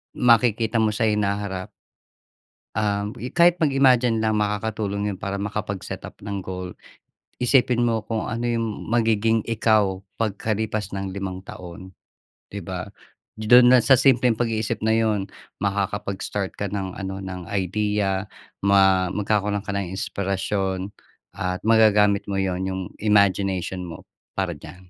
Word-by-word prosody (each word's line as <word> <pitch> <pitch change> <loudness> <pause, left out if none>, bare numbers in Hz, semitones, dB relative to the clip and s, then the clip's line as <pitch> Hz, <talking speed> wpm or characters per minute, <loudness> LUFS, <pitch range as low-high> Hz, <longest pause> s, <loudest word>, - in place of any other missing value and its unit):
makikita 115 -1 +3
mo 110 -1 +2
sa 110 - -1
hinaharap 100 -1 -2 1.0
um 105 0 -1
i 125 - -4
kahit 170 +2 +4
mag-imagine 130 -5 +4
lang 110 0 +1
makakatulong 105 -1 -1
yun 95 - -9
para 100 0 -4
makapag-setup 100 -1 -5
ng 100 -2 -3
goal. 90 -1 -6 0.7
Isipin 125 -1 +3
mo 115 -2 0
kung 110 -1 -3
ano 115 0 -3
yung 115 -3 -2
magiging 115 -1 +2
ikaw 105 -4 +2 0.2
pagkalipas 110 -1 -2
ng 95 -1 -4
limang 95 -2 -4
taon, 90 +1 -10 0.6
'di 100 - -4
ba? 90 +1 -5 0.5
Do'n 120 +3 +6
lang 125 - +5
sa 135 -2 +7
simpleng 125 -3 +4
pag-iisip 110 -4 -1
na 110 0 +2
yun, 105 -3 0 0.3
makakapag-start 100 0 -2
ka 100 -2 -3
ng 95 -2 -4
ano 95 -1 -5
ng 90 -2 -7
idea, 100 0 0 0.4
ma 95 -2 +4
magkakaroon 105 0 0
ka 100 - -3
ng 100 -3 -2
inspirasyon 95 0 -2 0.4
at 90 0 -2
magagamit 105 -2 +4
mo 100 - -1
'yon 95 -1 -1
yung 95 0 -3 0.2
imagination 95 -3 +2
mo 85 - -9 0.3
para 95 -3 0
diyan. 90 +4 -13
105 Hz, 135 wpm, -23 LUFS, 95-110 Hz, 1.0 s, sa